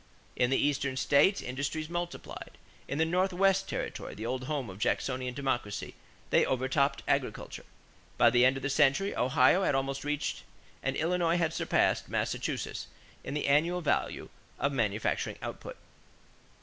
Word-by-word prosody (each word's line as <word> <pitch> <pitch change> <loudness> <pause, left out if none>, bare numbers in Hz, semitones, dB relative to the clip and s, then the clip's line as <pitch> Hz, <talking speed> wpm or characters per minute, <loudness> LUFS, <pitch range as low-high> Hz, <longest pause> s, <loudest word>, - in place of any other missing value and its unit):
In 125 - +2
the 135 - +2
Eastern 140 -2 0
states 145 +9 +3
industries 140 +5 -3
multiplied. 175 +1 -6 0.3
In 140 - -3
the 160 - +3
Northwest 190 +2 +2
territory, - - -4
the 110 - -6
old 130 +2 -2
home 140 -3 -2
of 95 0 -9
Jacksonian 125 +2 -1
Democracy, 130 -7 -2 0.4
they - - +5
overtopped 130 +2 +1
agriculture. - - -2 0.5
By 120 - +6
the 120 +1 +4
end 130 +1 +4
of 135 - -7
the 135 - 0
century, 150 +7 +3
Ohio 130 +7 +4
had 145 - +2
almost 135 0 -1
reached 150 0 -2 0.4
and - - -1
Illinois 170 +1 +1
had 165 -2 0
surpassed - - +1
Massachusetts - - -2 0.4
in - - -5
the 150 - -1
annual 165 +6 +2
value 155 - -1 0.3
of 140 - 0
manufacturing 110 -4 -1
output. - - -7
140 Hz, 150 wpm, -30 LUFS, 130-165 Hz, 0.5 s, By